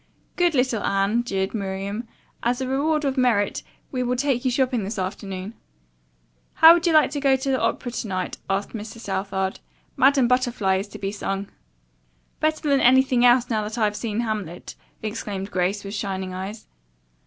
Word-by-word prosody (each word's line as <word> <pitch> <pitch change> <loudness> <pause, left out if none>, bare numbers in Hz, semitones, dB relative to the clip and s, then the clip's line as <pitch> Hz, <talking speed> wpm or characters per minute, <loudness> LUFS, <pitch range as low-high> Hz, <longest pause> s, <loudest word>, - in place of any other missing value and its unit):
"Good 350 -3 +2
little 250 -4 +1
Anne," 200 +4 +1
jeered 195 -5 -2
Miriam. 200 +2 -4 0.3
"As 245 +2 0
a 260 - -2
reward 295 +3 +1
of 270 -1 0
merit 230 -5 +2 0.3
we 255 - -2
will 250 0 0
take 260 -1 0
you 260 - +2
shopping 250 -3 +1
this 205 +3 -4
afternoon." 190 +1 -4 1.0
"How 325 +1 +9
would 345 0 +1
you 335 - +3
like 310 -3 +5
to 290 - -2
go 275 -1 +4
to 265 +1 -3
the 260 - +1
opera 245 - -1
to 235 - -4
night?" 185 -2 -3
asked 195 +1 -1
Mr. 220 0 -7
Southard. 190 -2 -3 0.4
"'Madame 270 -1 +4
Butterfly' 240 -6 +1
is 195 +2 -4
to 210 - -10
be 195 -1 -3
sung." 200 -1 -4 0.9
"Better 310 0 0
than 280 -1 +3
anything 260 0 +4
else, 245 0 +5
now 215 -1 +1
that 215 +2 -5
I've 210 -2 +1
seen 220 0 -2
'Hamlet'!" 210 -7 -4 0.3
exclaimed 205 -2 -4
Grace, 185 +3 0
with 200 0 -7
shining 190 -3 -3
eyes. 195 +4 -6
225 Hz, 175 wpm, -23 LUFS, 195-260 Hz, 1.0 s, How